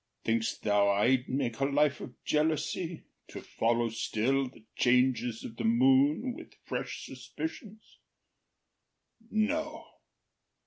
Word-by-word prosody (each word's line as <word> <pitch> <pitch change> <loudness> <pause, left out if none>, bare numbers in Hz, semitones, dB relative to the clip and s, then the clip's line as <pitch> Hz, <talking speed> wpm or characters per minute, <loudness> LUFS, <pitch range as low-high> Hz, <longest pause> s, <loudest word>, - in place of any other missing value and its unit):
Think’st 115 0 -1
thou 105 -1 +3
I’d 120 +6 +2
make 125 -4 -1
a 135 - +2
life 145 0 +2
of 125 - -8
jealousy, 160 +2 -1 0.2
To - - -8
follow 115 +1 0
still 125 +4 0
the 115 - -18
changes 125 -2 +2
of 115 - -8
the - - -3
moon 135 - +3
With - - -12
fresh - - -4
suspicions? 220 -9 -8 1.3
No. 305 +9 -1
130 Hz, 110 wpm, -30 LUFS, 115-155 Hz, 1.3 s, thou